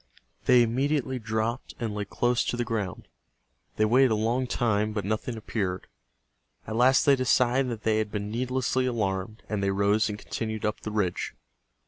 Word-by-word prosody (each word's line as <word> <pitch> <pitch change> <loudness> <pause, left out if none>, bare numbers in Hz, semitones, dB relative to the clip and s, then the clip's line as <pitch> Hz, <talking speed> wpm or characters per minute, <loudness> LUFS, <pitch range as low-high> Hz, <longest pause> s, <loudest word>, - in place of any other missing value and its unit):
They 125 -1 +6
immediately 130 +2 0
dropped 110 +2 -2
and 115 -3 -2
lay 105 0 -3
close 120 +4 +1
to 120 - -2
the 120 - 0
ground. 110 -6 -3 0.7
They 110 - +3
waited 130 +4 +5
a 110 - +2
long 115 +4 0
time, 110 -3 0
but 105 -2 -3
nothing 110 +3 -2
appeared. 100 -4 -3 0.8
At 110 - -5
last 130 +3 +4
they 140 - +6
decided 130 0 +2
that 115 -3 -5
they 110 -1 +2
had 105 -1 -2
been 105 0 -3
needlessly 130 +2 0
alarmed, 105 -2 -2
and 105 -2 -2
they 100 - +1
rose 100 +3 +2
and 105 - -4
continued 110 0 -4
up 105 +1 -1
the - - -6
ridge. 105 -4 -1
110 Hz, 175 wpm, -27 LUFS, 105-125 Hz, 0.8 s, They